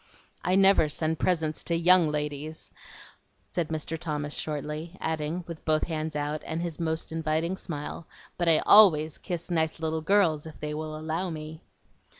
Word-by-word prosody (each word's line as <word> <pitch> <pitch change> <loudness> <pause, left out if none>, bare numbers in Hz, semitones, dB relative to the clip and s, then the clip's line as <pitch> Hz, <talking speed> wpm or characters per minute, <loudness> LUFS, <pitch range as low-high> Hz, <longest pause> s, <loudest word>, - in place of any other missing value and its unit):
"I 180 +2 +2
never 195 -5 +5
send 160 +1 -1
presents 160 -4 0
to 170 - +1
YOUNG 170 -1 +5
ladies," 150 +1 -4 0.7
said 170 -3 -2
Mr. 160 +1 -4
Thomas 150 -2 -3
shortly, 155 +3 -4
adding, 160 +2 -2
with 165 -2 -8
both 155 -1 +2
hands 155 -2 -3
out, 150 +1 -2
and 160 - -4
his 170 -2 -4
most 160 -1 -2
inviting 160 +2 -1
smile, 155 -2 -6 0.3
"But 175 -1 +1
I 160 - +4
ALWAYS 160 -8 +6
kiss 175 -1 -5
nice 160 -1 0
little 160 0 -2
girls 165 -4 +2
if 160 - -11
they 150 0 -4
will 155 0 -4
allow 160 +4 -2
me?" 155 0 -7
160 Hz, 160 wpm, -27 LUFS, 155-170 Hz, 0.7 s, ALWAYS